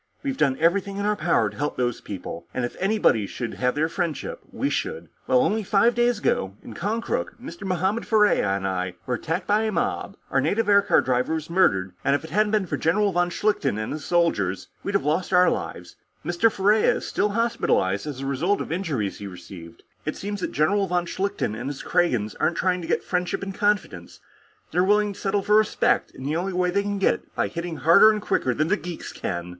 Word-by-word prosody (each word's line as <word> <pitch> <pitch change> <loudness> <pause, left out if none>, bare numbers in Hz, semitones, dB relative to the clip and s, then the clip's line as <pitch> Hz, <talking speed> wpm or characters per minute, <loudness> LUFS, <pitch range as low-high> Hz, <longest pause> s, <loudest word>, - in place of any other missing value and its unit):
We've 275 -2 -2
done 135 - +1
everything 195 +4 +1
in 200 - -2
our 210 0 +2
power 110 - +1
to - - -14
help 145 +1 -2
these 120 -2 -1
people, 95 -4 -7
and 125 - 0
if 120 - -6
anybody 190 - +2
should 120 +2 -5
have 125 0 0
their 155 +2 +1
friendship, 175 - -3
we - - -1
should. 475 - -3 0.2
Well, 255 -1 +4
only 220 -2 +1
five 210 +4 +3
days 240 0 +2
ago, 95 - -1
in - - -9
Konkrook, 225 +5 -3
Mr. 245 -5 -9
Mohammed 190 +5 0
Ferriera 210 - +3
and 95 0 -3
I 90 -1 -2
were 125 - -2
attacked 155 +7 -2
by 210 +1 +2
a 220 -1 0
mob, - - -2
our - - +3
native 225 0 0
aircar 200 0 +5
driver 125 +5 0
was 160 +1 -5
murdered, 95 - +2
and 140 - +3
if 145 - -3
it 160 - -10
hadn't 210 +4 +2
been 210 -3 +2
for - - -3
General 200 +5 +2
von 175 0 +1
Schlichten 175 - 0
and 110 0 -3
his 155 -1 -6
soldiers, 105 - 0
we'd 200 - -3
have 195 - +1
lost 160 +6 0
our 180 0 +6
own - - +3
lives. - - -7 0.3
Mr. 175 +7 +2
Ferriera 205 +3 +3
is - - -5
still 210 - 0
hospitalized 200 - 0
as 140 -3 -5
a - - -4
result 160 +9 0
of - - -5
injuries 155 - -2
he 100 - -6
received. 90 -2 -11 0.2
It - - -4
seems 205 0 -5
that - - -2
General 195 +6 +2
von 175 -1 0
Schlichten 190 - -2
and 120 +5 -4
his 145 - -6
Kragans 125 - +1
aren't 170 - +1
trying 180 -1 +1
to 165 - -7
get - - 0
friendship 180 +2 -2
and 195 0 -5
confidence; 205 - -1 0.5
they're 180 +3 +2
willing 205 +1 +2
to 200 - -13
settle 195 0 0
for 210 +2 +4
respect, 215 -1 +2
in 130 - -11
the 150 +4 -1
only 185 +2 -2
way 180 0 +1
they 200 +2 +2
can 200 0 -2
get 195 - +3
it - - -11
by - - +1
hitting 170 -1 -5
harder 165 +8 +7
and 215 -1 0
quicker 125 - 0
than 155 - +1
the 205 - +4
geeks 175 -3 -7
can." 85 0 -4
175 Hz, 225 wpm, -24 LUFS, 130-205 Hz, 0.5 s, harder